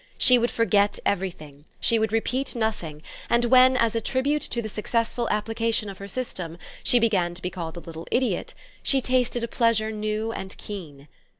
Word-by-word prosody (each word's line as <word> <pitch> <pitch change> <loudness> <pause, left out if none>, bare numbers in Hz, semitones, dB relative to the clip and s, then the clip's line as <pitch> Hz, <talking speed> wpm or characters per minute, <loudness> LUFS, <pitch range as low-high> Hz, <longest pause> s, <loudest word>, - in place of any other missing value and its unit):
She 250 -1 +6
would 240 +1 +1
forget 205 -3 +2
everything, 155 -7 -3
she 230 - +3
would 220 -1 0
repeat 250 +5 -1
nothing, 180 -10 -3 0.3
and 235 0 +3
when, 255 +1 +6
as 230 -3 +2
a 230 - 0
tribute 275 +6 0
to 235 - -1
the 225 - -3
successful 230 +2 -1
application 225 0 0
of 195 - -9
her 200 - -7
system, 185 -8 -4 0.3
she 245 - +4
began 195 -7 +2
to 180 - -7
be 180 - -2
called 170 -2 -6
a - - -6
little 165 0 -9
idiot, 255 0 0 0.3
she 270 - +2
tasted 250 -2 +1
a - - -1
pleasure 230 -2 +2
new 215 +1 -2
and 190 -4 -7
keen. 150 -9 -8
220 Hz, 185 wpm, -25 LUFS, 185-235 Hz, 0.3 s, She